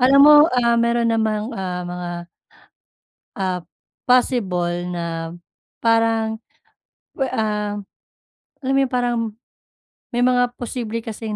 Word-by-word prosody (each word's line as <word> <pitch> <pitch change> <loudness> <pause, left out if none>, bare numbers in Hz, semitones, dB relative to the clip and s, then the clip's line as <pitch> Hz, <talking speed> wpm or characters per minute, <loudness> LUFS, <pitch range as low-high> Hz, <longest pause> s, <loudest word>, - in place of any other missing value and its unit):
Alam 270 +2 +6
mo, 300 0 +9 0.2
ah, 235 -2 +2
meron 235 0 +2
namang, 220 0 0
ah, 180 -2 -3
mga, 175 0 -5 1.3
ah, 185 -2 -1 0.5
possible 180 -9 +1
na 165 -1 -4 0.5
parang, 225 -1 +2 0.8
we 270 - +1
ah, 210 -1 -1 0.9
alam 265 +1 0
mo 275 - +4
'yung 265 - -1
parang, 245 -1 +1 1.0
may 240 +1 +2
mga 245 -1 +2
posible 230 -2 -4
kasing 220 -1 -5
225 Hz, 110 wpm, -21 LUFS, 185-245 Hz, 1.3 s, mo